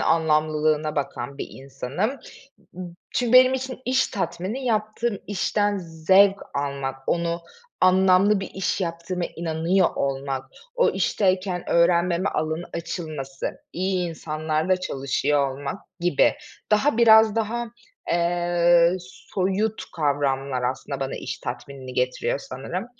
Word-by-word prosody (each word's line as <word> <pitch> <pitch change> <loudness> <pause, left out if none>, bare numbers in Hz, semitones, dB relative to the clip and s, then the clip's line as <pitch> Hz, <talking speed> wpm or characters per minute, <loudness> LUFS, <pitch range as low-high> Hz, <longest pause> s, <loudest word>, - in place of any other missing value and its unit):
anlamlılığına 155 -1 +1
bakan 140 0 -4
bir - - -4
insanım. 135 - -3 0.6
Imm, 175 -1 -8 0.2
çünkü 245 -1 0
benim 255 +1 +7
için 260 -1 -4
iş 260 +1 +2
tatmini 195 +6 -3
yaptığım 215 0 -1
işten 205 +1 0
zevk 190 +4 +3
almak, 140 -1 -2
onu 170 0 0 0.4
anlamlı 190 +2 +5
bir 195 - -6
iş 190 +1 -1
yaptığıma 170 +1 -3
inanıyor 170 +3 +1
olmak, 135 -1 -2 0.3
o - - +4
işteyken 185 -2 0
öğrenmeme 170 +2 +3
alanı 155 +2 -2
açılması, 155 -5 -5
iyi 185 -1 -1
insanlarla 155 +2 -1
çalışıyor 140 -4 0
olmak 140 +1 -5 0.2
gibi. 175 -5 +3 0.4
Daha 220 +4 +3
biraz 220 -1 +7
daha, 235 +2 -1 0.5
eee, 175 0 +3
soyut 190 +4 -2
kavramlar 140 -3 0
aslında 135 +2 -3
bana 135 0 -2
iş 130 0 -5
tatminini 130 +1 -7
getiriyor 125 +2 0
sanırım. 175 - -6
170 Hz, 110 wpm, -24 LUFS, 145-195 Hz, 0.6 s, benim